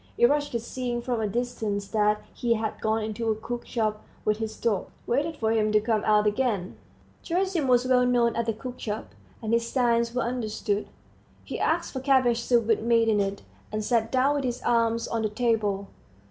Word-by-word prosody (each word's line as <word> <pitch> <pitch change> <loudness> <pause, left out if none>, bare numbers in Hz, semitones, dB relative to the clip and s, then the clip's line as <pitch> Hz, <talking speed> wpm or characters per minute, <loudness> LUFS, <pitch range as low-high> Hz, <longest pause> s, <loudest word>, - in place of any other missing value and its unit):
Eroshka, 290 0 +3
seeing 240 +1 -3
from 240 -2 -2
a 215 - 0
distance 210 -3 -2
that 210 0 +1
he 235 -1 +1
had 220 -1 -3
gone 220 0 +1
into 220 +1 -2
a 220 - +2
cookshop 220 -1 -3 0.2
with 215 0 +2
his 220 -1 -4
dog, 215 -5 0 0.2
waited 295 +6 0
for 220 -3 0
him 215 -1 +2
to 215 - +5
come 220 0 0
out 210 -1 +4
again. 210 -4 0 0.5
Gerasim 360 -4 0
was 250 0 +4
well 255 -1 +4
known 240 -2 +2
at 235 0 -1
the 225 - +1
cookshop, 220 -2 -6 0.3
and 220 +1 -1
his 235 0 +1
signs 235 -2 +1
were 250 - +1
understood. 220 -3 -2 0.6
He - - -5
asked - - 0
for 265 - -3
cabbage 255 -3 +3
soup 235 -1 +2
with 225 -1 +2
meat 230 0 +3
in 210 -1 +3
it, 200 0 -2 0.3
and 215 0 -2
sat 225 -1 +1
down 265 +2 +3
with 280 - -2
his 245 -1 -3
arms 230 -1 +2
on 230 - -1
the 215 - 0
table. 210 -3 0
230 Hz, 190 wpm, -26 LUFS, 215-245 Hz, 0.6 s, to